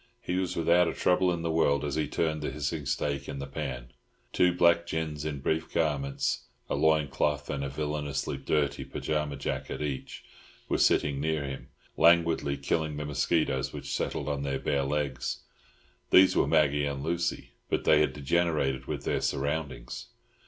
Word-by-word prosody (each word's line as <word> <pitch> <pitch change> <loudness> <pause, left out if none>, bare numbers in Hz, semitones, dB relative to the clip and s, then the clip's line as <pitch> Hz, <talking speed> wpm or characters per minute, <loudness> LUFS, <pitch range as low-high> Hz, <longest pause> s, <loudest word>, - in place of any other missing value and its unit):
He 90 - -2
was 95 -1 -1
without 85 +1 +4
a - - -2
trouble 90 0 +3
in 85 -1 -3
the 85 - 0
world 75 -3 +2
as 70 - -2
he 80 +1 0
turned 80 -2 -1
the 75 - -2
hissing 75 -1 -3
steak 70 0 -1
in - - -5
the 70 - -4
pan. 65 -3 -5 0.4
Two 90 0 +4
black 85 -1 +3
gins 80 -3 -3
in 75 -3 -3
brief 80 +3 -1
garments—a 70 -4 -2
loin 80 -2 +3
cloth 75 +1 -1
and 70 -1 -2
a 70 - -2
villainously 75 -1 -2
dirty 75 -2 0
pyjama 75 -2 -2
jacket 65 - -4
each—were 70 -3 -5
sitting 70 -2 +3
near 80 -1 0
him, 70 -1 -6 0.3
languidly 85 -4 +4
killing 75 +2 -1
the 75 - -3
mosquitoes 70 -2 0
which 70 -2 -5
settled 70 - -2
on 70 -1 -1
their 70 -1 -1
bare 70 0 0
legs. 70 -3 -2 0.7
These 95 0 +7
were - - +3
Maggie 75 -1 +3
and 70 -1 -4
Lucy, 85 +2 -2 0.2
but - - 0
they - - +5
had - - +2
degenerated 75 -2 0
with - - -4
their - - 0
surroundings. 70 -4 -3
75 Hz, 165 wpm, -29 LUFS, 70-80 Hz, 0.7 s, These